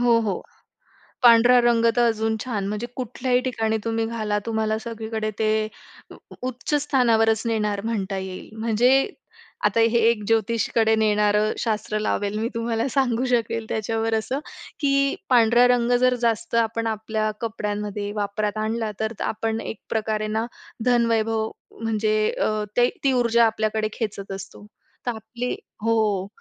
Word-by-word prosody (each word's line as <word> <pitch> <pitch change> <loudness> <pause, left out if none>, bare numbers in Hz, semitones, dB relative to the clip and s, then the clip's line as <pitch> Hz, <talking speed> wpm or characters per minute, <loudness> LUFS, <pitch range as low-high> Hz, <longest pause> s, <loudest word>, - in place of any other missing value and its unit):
हो, 240 -1 +4
हो, 210 -4 -2 0.8
पांढरा 240 +1 +7
रंग 235 -1 +3
तर 240 0 +4
अजून 220 0 0
छान. 215 -6 -2
म्हणजे 210 +3 -3
कुठल्याही 250 0 0
ठिकाणी 225 -4 -1
तुम्ही 225 0 0
घाला. 215 -2 -1
तुम्हाला 220 -1 0
सगळीकडे 220 -1 -4
ते 215 0 +1 0.4
उ - - -11 0.3
उच्च 255 +4 -4
स्थानावरच 225 -6 +3
नेणार 210 -3 0
म्हणता 200 -4 -2
येईल. 190 -1 -7
म्हणजे 230 +2 +2 0.7
आता 210 +2 +3
हे 230 +1 +4
एक 225 -3 -1
ज्योतिषीकडे 225 0 +2
नेणारं 210 -1 +2
शास्त्र 215 -1 -1
लावेल 210 -1 -1
मी 225 +1 -1
तुम्हाला, 230 0 -1
सांगू 250 -2 +1
शकेल 230 -2 0
त्याच्यावर 225 +1 -1
असं 220 +5 -1 0.4
की, 275 -1 +2
पांढरा 240 -1 +5
रंग 245 -1 +2
जर 255 0 +4
जास्त 230 0 0
आपण 230 0 -2
आपल्या 220 0 -1
कपड्यांमध्ये 210 -2 -3
वापरात 210 +1 -2
आणला 220 0 -1
तर, 220 +1 -1
आपण 225 +1 -2
एक 225 - -6
प्रकारे 215 -1 -1
ना 220 +2 -1 0.4
धनवैभव 225 -2 +2 0.3
म्हणजे 215 -1 0 0.2
अ, - - 0 0.3
ते 245 0 +5 0.2
ती 270 - +4
ऊर्जा 235 -2 +4
आपल्याकडे 215 -1 0
खेचत 200 -4 -4
असतो. 195 +1 -9 0.4
तर - - +2
आपली 230 +3 -4 0.3
हो, 215 -4 +1
225 Hz, 140 wpm, -23 LUFS, 215-235 Hz, 0.8 s, पांढरा